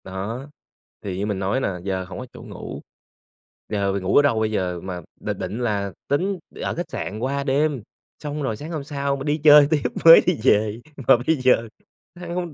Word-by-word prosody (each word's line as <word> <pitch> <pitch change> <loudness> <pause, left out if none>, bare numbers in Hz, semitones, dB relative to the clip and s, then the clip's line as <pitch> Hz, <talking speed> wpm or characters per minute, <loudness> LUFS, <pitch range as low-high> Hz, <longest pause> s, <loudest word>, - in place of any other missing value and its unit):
Đó, 110 +9 -6 0.5
thì 95 -3 -4
như 100 - -1
mình 105 -2 -2
nói 100 +6 0
nà 95 -8 -2
giờ 95 -1 -2
hổng 95 - -8
có 130 - -6
chỗ - - -11
ngủ, - - -8 0.9
giờ 100 -2 0
mình 100 -1 -3
ngủ 95 - 0
ở - - +8
đâu 140 -6 +2
bây 110 0 0
giờ 90 -4 -1
mà 90 -2 -5 0.2
định - - -4
định 110 - -4
là 105 -5 -1 0.2
tính 185 +7 0 0.2
ở - - -2
khách 175 - -4
sạn 105 +3 -4
qua 140 +3 -1
đêm, 140 -1 +1 0.4
xong 150 0 -4
rồi 110 -5 -2
sáng 155 +7 -8
hôm 155 -4 -4
sau 140 -1 -2
mà 135 - -6
đi 145 +1 0
chơi 150 -1 +8
tiếp 150 -3 +2 0.2
mới 165 0 +11
đi 180 -3 +2
về, 110 -3 +3 0.3
mà - - +7
bây 160 - +4
giờ 125 -3 +3 0.5
ha 175 0 -9
hông 175 -3 -3
130 Hz, 215 wpm, -23 LUFS, 100-145 Hz, 0.9 s, mới